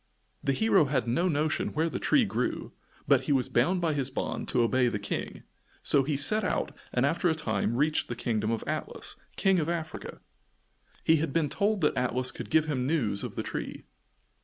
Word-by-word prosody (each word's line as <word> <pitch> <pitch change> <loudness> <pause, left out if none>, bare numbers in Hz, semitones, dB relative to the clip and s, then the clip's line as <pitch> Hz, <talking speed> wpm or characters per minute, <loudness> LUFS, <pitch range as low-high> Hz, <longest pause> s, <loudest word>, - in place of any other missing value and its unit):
The 135 - +1
hero 195 -1 +4
had 135 -3 0
no 150 +10 +1
notion 155 -1 0
where 160 +2 +2
the 165 - -3
tree - - +3
grew, - - -2 0.4
but - - +4
he - - -1
was 130 -3 +2
bound 175 +10 +2
by 165 -2 +1
his 135 -3 -1
bond 130 - -3
to 120 - +2
obey 125 +2 +2
the 110 - -1
King, 100 - -5 0.4
so 140 - +5
he 140 +1 -1
set 215 +10 +3
out 185 - -1 0.2
and 125 +2 +2
after 170 +4 +1
a 160 - +1
time 115 -7 -1
reached 150 +4 +1
the 120 - -4
kingdom 110 -2 -1
of 115 -1 -1
Atlas, - - -4 0.2
King 190 -2 +3
of 160 0 -1
Africa. 165 -2 -5 0.8
He 160 - +5
had 155 -1 -1
been 155 0 +1
told 205 +3 0
that 150 - +2
Atlas 125 0 0
could - - -8
give 160 -1 +3
him 130 -5 -1
news 120 -10 +1
of - - -6
the - - -2
tree. - - -5
145 Hz, 205 wpm, -28 LUFS, 125-165 Hz, 0.8 s, so